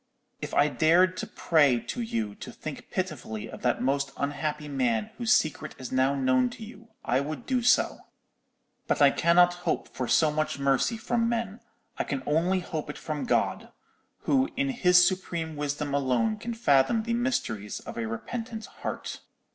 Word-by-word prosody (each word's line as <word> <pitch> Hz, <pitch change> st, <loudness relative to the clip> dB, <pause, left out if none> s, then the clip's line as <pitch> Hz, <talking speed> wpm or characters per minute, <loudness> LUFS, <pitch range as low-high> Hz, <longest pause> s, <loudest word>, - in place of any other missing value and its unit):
If -, -, -5 dB
I 145 Hz, -, +5 dB
dared 175 Hz, +5 st, +3 dB
to -, -, -4 dB
pray 145 Hz, -7 st, +3 dB
to 240 Hz, -, -5 dB
you 115 Hz, -, -2 dB
to -, -, -9 dB
think -, -, -8 dB
pitifully 110 Hz, -1 st, -4 dB
of -, -, -10 dB
that 120 Hz, -1 st, 0 dB
most 140 Hz, +1 st, 0 dB
unhappy 150 Hz, +1 st, -2 dB
man 125 Hz, -6 st, 0 dB
whose 235 Hz, -2 st, +1 dB
secret 155 Hz, -9 st, +1 dB
is 130 Hz, -2 st, -7 dB
now 130 Hz, +2 st, +2 dB
known 130 Hz, -2 st, +2 dB
to 225 Hz, -, -9 dB
you, 230 Hz, +1 st, -13 dB, 0.2 s
I 125 Hz, +2 st, +2 dB
would 155 Hz, -, -5 dB
do 255 Hz, -2 st, 0 dB
so; 245 Hz, -, +3 dB, 0.9 s
but -, -, +1 dB
I 140 Hz, -1 st, +7 dB
cannot 175 Hz, +3 st, +4 dB
hope -, -, -1 dB
for 125 Hz, -, -4 dB
so 155 Hz, +4 st, +4 dB
much 155 Hz, 0 st, -1 dB
mercy 140 Hz, -, +1 dB
from 230 Hz, +1 st, 0 dB
men: 230 Hz, -2 st, -2 dB, 0.4 s
I -, -, +2 dB
can 135 Hz, -2 st, -4 dB
only 175 Hz, +5 st, +1 dB
hope 160 Hz, -4 st, -5 dB
it 150 Hz, -, -6 dB
from 150 Hz, -2 st, -4 dB
God, -, -, 0 dB, 0.5 s
who 270 Hz, 0 st, +2 dB
in 275 Hz, +1 st, +1 dB
His 180 Hz, -8 st, +5 dB
supreme 170 Hz, -4 st, -3 dB
wisdom 145 Hz, 0 st, -3 dB
alone 140 Hz, -, +1 dB
can 235 Hz, +2 st, -5 dB
fathom 145 Hz, -, +3 dB
the 235 Hz, +1 st, -2 dB
mysteries 180 Hz, -, -2 dB
of -, -, -9 dB
a 115 Hz, -1 st, -3 dB
repentant 225 Hz, -, -5 dB
heart. -, -, -6 dB
155 Hz, 175 wpm, -27 LUFS, 135-220 Hz, 0.9 s, I